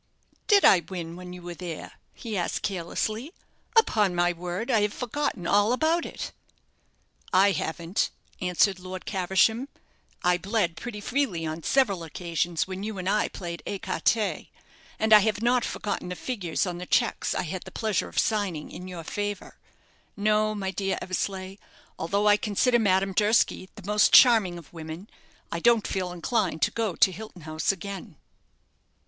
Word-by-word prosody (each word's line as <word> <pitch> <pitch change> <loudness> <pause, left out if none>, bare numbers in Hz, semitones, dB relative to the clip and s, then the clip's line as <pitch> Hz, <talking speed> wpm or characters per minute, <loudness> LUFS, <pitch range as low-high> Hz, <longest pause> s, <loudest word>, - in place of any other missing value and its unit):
"Did 405 -2 +6
I 190 - +8
win 170 -1 -7
when 180 0 -9
you 180 -1 -10
were 175 0 -6
there?" 170 -2 -7 0.2
he 225 -3 -5
asked, 175 -3 -2
carelessly. 215 - -3 0.4
"Upon 210 - +4
my 175 0 +2
word, 180 +8 -4
I 225 -3 +4
have 210 0 0
forgotten 250 -7 -2
all 205 +5 +3
about 320 +5 +1
it." - - -6 1.0
"I 195 +2 +5
haven't," 170 +1 -1 0.3
answered 185 +2 +2
Lord 185 0 -7
Caversham. 195 +6 +2 0.6
"I 180 0 +3
bled 195 -3 0
pretty 210 +4 -6
freely 235 -9 -1
on 160 +1 -4
several 200 - +2
occasions 170 +1 -2
when 190 0 -6
you 210 0 -4
and 185 0 -4
I 210 +2 +2
played 170 -2 -6
écarté; 200 +2 0 0.5
and 220 0 +3
I 210 - +11
have 215 +1 0
not 245 0 +3
forgotten 205 -3 -3
the 180 - -4
figures 195 -8 -2
on 175 -2 -4
the 180 - -7
cheques 235 - +1
I - - 0
had 180 +2 -4
the - - -10
pleasure 215 -4 -1
of - - -14
signing 200 -8 0
in 180 - -8
your 175 -3 -7
favour. 205 +3 -5 0.6
No, 215 +1 +2
my 195 -2 -2
dear 195 0 -1
Eversleigh, 190 +1 -3 0.4
although 200 +6 +1
I 205 0 +6
consider 235 +4 +2
Madame 195 -2 +2
Durski 210 -2 +2
the 210 -4 -11
most 210 +1 +4
charming 220 -9 +7
of 170 -2 -13
women, 160 +4 -8 0.4
I 170 - -2
don't 230 +3 +4
feel 185 -2 -2
inclined 180 - -1
to - - +3
go 220 -6 -1
to 190 - +5
Hilton 185 -2 -10
House 155 +2 0
again." 195 -1 -7
195 Hz, 165 wpm, -26 LUFS, 175-215 Hz, 1.0 s, I